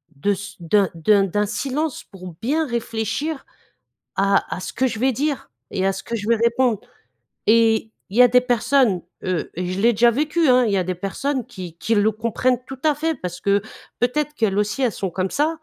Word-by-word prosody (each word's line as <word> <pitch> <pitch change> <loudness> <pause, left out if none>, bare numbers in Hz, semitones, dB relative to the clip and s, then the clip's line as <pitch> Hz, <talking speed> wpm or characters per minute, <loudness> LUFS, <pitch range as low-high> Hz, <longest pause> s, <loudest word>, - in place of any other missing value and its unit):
de 200 +9 +1
ce 200 +1 -8
d'un 190 +3 +2
d'un 195 +5 +3
d'un 205 +2 0
silence 270 +7 -2
pour 185 -4 -11
bien 305 +7 +1
réfléchir 235 +5 -3 0.7
à 195 0 +3
à - - -6
ce - - -5
que 260 - +1
je 225 -3 -4
vais 260 +3 +3
dire 285 +3 -2 0.2
et 190 - -1
à - - +3
ce 195 - -7
que 235 - -4
je 210 -2 -4
vais 235 - +4
répondre. 235 -1 +2 0.7
Et 225 0 +4 0.2
il 200 - -6
y 250 - +8
a 250 - +7
des 250 +1 +5
personnes, 245 -5 +2 0.2
heu, 180 -4 -2
je 180 +2 -2
l'ai 235 +3 +5
déjà 235 +2 +5
vécu, 305 +5 +1
hein, 250 0 +5
il 215 - 0
y - - +2
a 185 - 0
des 185 +1 -2
personnes 245 +9 -2
qui 180 -8 -9
qui 225 - 0
le 210 +1 +3
comprennent 235 +3 0
tout 265 - -8
à 305 -1 +4
fait, 320 +2 -1
parce 180 -5 -6
que, 200 0 +2 0.4
peut-être 295 +5 0
qu'elles 210 -7 0
aussi, 210 +4 -1
elles 245 -4 +2
sont 190 -1 -3
comme 185 +2 -2
ça. 315 +3 0
225 Hz, 215 wpm, -22 LUFS, 195-255 Hz, 0.7 s, y